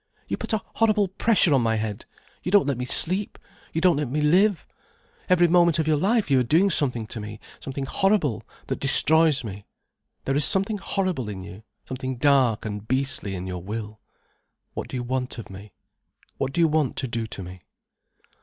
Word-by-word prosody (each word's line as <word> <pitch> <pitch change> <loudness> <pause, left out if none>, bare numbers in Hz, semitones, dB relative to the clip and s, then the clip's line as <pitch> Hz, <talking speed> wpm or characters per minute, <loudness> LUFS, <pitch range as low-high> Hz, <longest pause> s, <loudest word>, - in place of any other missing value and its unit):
You - - -1
put - - -6
a 220 -3 0
horrible 215 -3 +3
pressure 195 -4 +2
on 135 - +4
my 115 -1 +1
head, 110 0 -4 0.3
you - - -4
don't 205 -4 +5
let 135 -3 -1
me 125 - -2
sleep, 185 +10 0 0.3
you 160 - -2
don't 175 -3 +4
let 145 -4 -2
me 150 +4 -1
live. 180 +5 +3 0.6
Every 175 -1 +5
moment 170 -1 +4
of 160 -1 0
your 155 - +3
life 205 +2 +1
you 135 - +5
are - - +2
doing 170 +11 +3
something 125 -8 0
to 110 - -7
me, 105 0 -8 0.2
something 135 0 -5
horrible, 195 - +1 0.2
that - - -3
destroys 155 +1 +3
me. 100 -2 -8 0.6
There 135 - 0
is 145 - +2
something 195 +5 +2
horrible 185 - -2
in 95 -2 -6
you, 95 +2 -10 0.2
something 130 0 -4
dark 130 -5 +3
and 105 0 -5
beastly 130 -6 0
in 90 0 -5
your 90 -1 -5
will. 105 +2 -6 0.7
What - - -5
do - - -5
you 125 - -3
want 125 +1 -3
of 115 - -9
me? 100 +2 -11 0.7
What 135 - -1
do 170 - 0
you 165 - +5
want 150 -4 0
to 130 - -2
do 115 -1 -3
to 100 - -7
me?" 90 0 -10
135 Hz, 200 wpm, -24 LUFS, 110-175 Hz, 0.7 s, don't